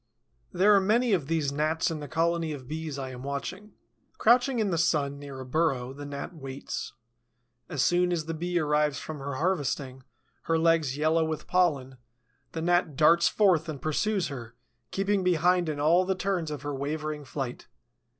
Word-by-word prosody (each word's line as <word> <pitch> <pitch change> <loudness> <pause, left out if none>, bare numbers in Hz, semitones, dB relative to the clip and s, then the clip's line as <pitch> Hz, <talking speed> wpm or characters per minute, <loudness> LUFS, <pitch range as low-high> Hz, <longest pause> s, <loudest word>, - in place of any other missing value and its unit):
There 205 +3 +4
are 200 - +5
many 225 +4 +2
of 160 -8 0
these 155 -3 0
Gnats 155 +3 0
in 160 - -4
the 145 - -7
colony 165 +2 0
of 130 -4 -9
Bees 155 -1 -5
I 135 -1 -5
am 125 -1 -9
watching. 180 +10 -5 0.4
Crouching 245 +3 +4
in 210 -4 +1
the 170 - 0
sun, 145 -4 +1
near 140 -2 -8
a 130 - -7
burrow, 130 -3 0
the 145 +1 -8
Gnat 140 +5 -6
waits. 135 -3 -6 0.8
As 145 -7 0
soon 180 0 +3
as 165 -3 -1
the 165 - -3
Bee 175 +2 -2
arrives 150 -2 +1
from 155 -2 -6
her 140 0 -4
harvesting, 140 -5 -1 0.4
her 165 - +2
legs 160 -4 +2
yellow 160 +2 +2
with 160 -1 -3
pollen, 140 -8 +1 0.6
the 160 - -3
Gnat 175 -4 +2
darts 165 +4 +5
forth 175 -6 +3
and 150 -3 -5
pursues 190 +6 0
her, 120 -4 -8 0.3
keeping 195 0 0
behind 180 0 +2
in 150 -1 -3
all 165 +5 +4
the 190 +1 0
turns 185 -4 -1
of 145 -3 -6
her 145 0 -3
wavering 150 +2 -3
flight. 130 -2 -5
155 Hz, 180 wpm, -28 LUFS, 140-175 Hz, 0.8 s, are